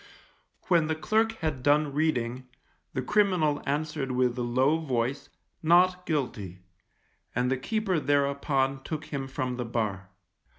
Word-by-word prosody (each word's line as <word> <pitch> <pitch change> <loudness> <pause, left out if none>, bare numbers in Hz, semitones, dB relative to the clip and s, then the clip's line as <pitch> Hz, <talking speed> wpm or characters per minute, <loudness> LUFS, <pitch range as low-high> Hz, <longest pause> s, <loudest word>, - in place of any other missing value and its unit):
When 170 -4 +3
the 160 - 0
clerk 220 +9 +1
had 150 -5 -1
done 145 +1 +3
reading, 130 -5 -1 0.5
the 130 - -2
criminal 180 -5 +2
answered 150 -1 -1
with 125 -1 +2
a 125 - -3
low 130 +6 +2
voice, 135 -1 -2 0.3
Not 180 +2 +4
Guilty, 105 - -3 0.7
and 125 +1 +1
the 135 - +1
keeper 195 - 0
thereupon 140 -1 +1
took 155 +2 -5
him 135 -1 -2
from 130 -2 -3
the 125 - -3
bar. 105 -5 -2
140 Hz, 135 wpm, -28 LUFS, 125-155 Hz, 0.7 s, Not